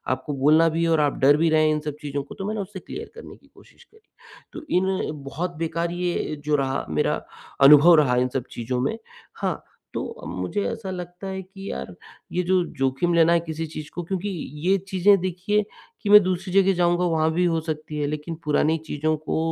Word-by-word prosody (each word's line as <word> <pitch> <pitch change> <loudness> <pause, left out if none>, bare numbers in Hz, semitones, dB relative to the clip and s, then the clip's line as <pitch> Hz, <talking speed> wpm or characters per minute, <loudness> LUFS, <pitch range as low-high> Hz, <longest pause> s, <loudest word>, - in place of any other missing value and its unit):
आपको 145 - -6
बोलना 160 +3 +5
भी 165 +1 -1
है 165 - +2
और 160 - +3
आप 145 -1 0
डर 145 +2 +5
भी 165 +1 +2
रहे 155 0 +4
हैं 155 - +3
इन 155 - 0
सब 145 - -7
चीज़ों 145 -1 -3
को। 140 - -12
तो 195 - -6
मैंने 215 0 -2
उसे 195 0 -7
क्लियर - - -8
करने 465 - -11
की - - -25
कोशिश - - -19
करी। 440 0 -26 0.5
तो 330 - -8
इन 185 - +2 0.4
बहुत 170 +6 -4
बेकार 165 +1 -2
ये 175 -3 -2
जो 150 0 +2
रहा, 135 -1 -1
मेरा 75 - 0 0.4
अनुभव 150 +5 +8
रहा 140 -5 +3
इन 125 +1 +2
सब 125 - -3
चीज़ों 120 +1 -3
में। 140 - -1 0.4
हाँ, - - -3 0.3
तो - - -5
मुझे 90 - -3
ऐसा 225 -4 -6
लगता 180 +1 -7
है 190 0 -4
कि 195 +1 -10
यार 65 0 -6 0.4
ये 180 - 0
जो 185 0 +2
जोखिम 135 +6 +1
लेना 170 0 +5
है 170 - +4
किसी 160 0 -3
चीज़ 155 -1 -8
को 175 - -3
क्योंकि 190 +3 -3 0.4
ये 195 +2 +4
चीज़ें 195 +1 +4
देखिए 185 +4 0 0.4
कि 205 - -3
मैं 210 0 +10
दूसरी 185 0 -2
जगह 195 0 +4
जाऊँगा 175 0 +2
वहाँ 160 -2 +2
भी 180 +2 +2
हो 165 -2 +1
सकती 155 -1 -5
है 145 - 0
लेकिन 150 +3 -4
पुरानी 150 +2 +2
चीज़ों 155 +2 0
को 155 +1 -3
165 Hz, 215 wpm, -24 LUFS, 150-185 Hz, 0.5 s, मैं